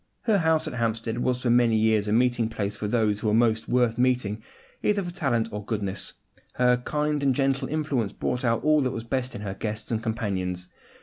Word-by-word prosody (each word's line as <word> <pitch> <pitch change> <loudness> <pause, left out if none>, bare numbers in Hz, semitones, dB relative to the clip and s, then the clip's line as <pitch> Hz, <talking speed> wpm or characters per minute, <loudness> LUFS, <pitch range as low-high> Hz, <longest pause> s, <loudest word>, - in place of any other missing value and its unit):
Her 215 -4 +2
house 160 -2 +2
at - - -4
Hampstead 115 -1 -2
was 125 0 0
for 120 - +2
many 120 -2 +4
years 110 -1 +2
a - - -1
meeting 120 0 +2
place 105 -2 -3
for 105 0 -4
those 105 -2 +1
who 110 - -2
were 105 - +3
most 110 -1 +2
worth 120 -2 +2
meeting, 125 -4 +1 0.4
either 205 -1 +1
for 175 - -5
talent 120 -9 0
or 105 0 -5
goodness; 100 -3 -3 0.4
her 125 0 +4
kindly 150 +2 -1
and 130 - +3
gentle 135 0 +1
influence 145 -9 -1
brought 125 - -3
out 115 -2 +1
all 155 0 +4
that 130 - +1
was 115 - -4
best 130 +2 -2
in - - -6
her 100 -2 -4
guests 105 +2 -4
and 110 -1 0
companions. 95 -6 -3
115 Hz, 210 wpm, -26 LUFS, 110-130 Hz, 0.4 s, many